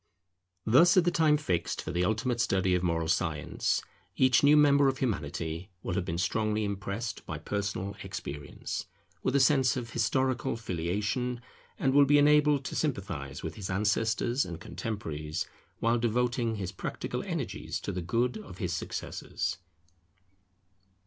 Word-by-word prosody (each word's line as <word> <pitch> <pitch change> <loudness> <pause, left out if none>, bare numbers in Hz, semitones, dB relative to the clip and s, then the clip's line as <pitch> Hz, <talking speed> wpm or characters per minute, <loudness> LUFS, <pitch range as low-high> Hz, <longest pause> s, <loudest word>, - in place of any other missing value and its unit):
Thus 165 - +6
at 180 - +6
the 175 - +3
time 155 -3 +4
fixed 90 - -1
for - - -4
the 90 +1 +1
ultimate 120 +3 0
study 95 -5 +2
of 90 - +2
moral 85 -2 0
science, 80 -3 0 0.3
each 130 -2 +5
new 145 +1 +6
member 145 -1 +6
of 135 0 +1
Humanity 85 - -3
will 90 - -2
have 90 -1 -1
been 85 - -2
strongly 110 +4 0
impressed 100 +2 -3
by - - -4
personal 100 -1 -3
experience, 75 +1 -5 0.3
with 130 - 0
a - - +5
sense 135 0 +4
of 120 -2 -5
historical 130 +3 +1
Filiation, 105 +6 -2 0.4
and 130 - +1
will 145 0 +7
be 145 +1 +5
enabled 150 -1 +4
to - - -4
sympathize 95 - -3
with - - -4
his 100 -3 -6
ancestors 110 +6 +1
and 85 -2 -6
contemporaries, 80 -8 -4 0.4
while 115 +1 +3
devoting 120 0 +1
his 95 -3 -4
practical 95 - -4
energies - - -3
to - - -3
the 90 - -3
good 115 +6 0
of 95 -4 -11
his 90 -2 -2
successors. 90 - -3
110 Hz, 150 wpm, -29 LUFS, 90-130 Hz, 0.4 s, will